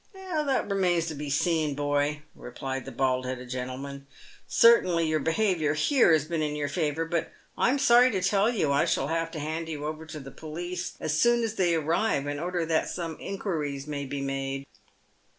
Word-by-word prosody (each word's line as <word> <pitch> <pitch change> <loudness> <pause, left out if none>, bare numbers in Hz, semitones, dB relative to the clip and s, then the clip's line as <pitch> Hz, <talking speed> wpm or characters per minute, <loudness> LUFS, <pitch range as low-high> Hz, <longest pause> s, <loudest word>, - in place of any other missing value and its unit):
" - - -37
That 320 -8 -1
remains 180 -4 +1
to - - -4
be 145 0 -5
seen, 155 0 +1
boy," 145 +1 0
replied 135 +1 -6
the 135 - -7
bald 130 0 0
headed 125 -1 -5
gentle 130 0 -4
man. 140 0 -8 0.2
" - - -24
Certainly 180 -8 +5
your 155 0 +1
behaviour, 165 -2 +1
here, 245 - +4
has 155 -3 +3
been 165 0 -2
in 150 -1 -1
your 145 -1 -2
favour; 155 0 -1
but 165 0 -2 0.2
I - - +2
am 270 - +2
sorry 250 -2 +6
to 195 -6 -1
tell 200 +3 +3
you 200 -12 +1
I 140 - +3
shall 135 - 0
have 165 0 -1
to 155 - -4
hand 160 +2 -3
you 150 -2 -4
over 155 +1 -5
to 155 -1 -7
the 135 -1 -10
police 175 +3 -5
as 155 - -1
soon 240 0 +4
as 225 -1 -1
they 175 -5 +2
arrive, 160 0 +1
in 145 0 -3
order 175 0 -1
that 160 0 +1
some 165 -3 -4
inquiries 150 -8 -3
may 145 -2 -4
be 140 +1 -4
made." 135 0 -3
155 Hz, 205 wpm, -27 LUFS, 145-180 Hz, 0.2 s, sorry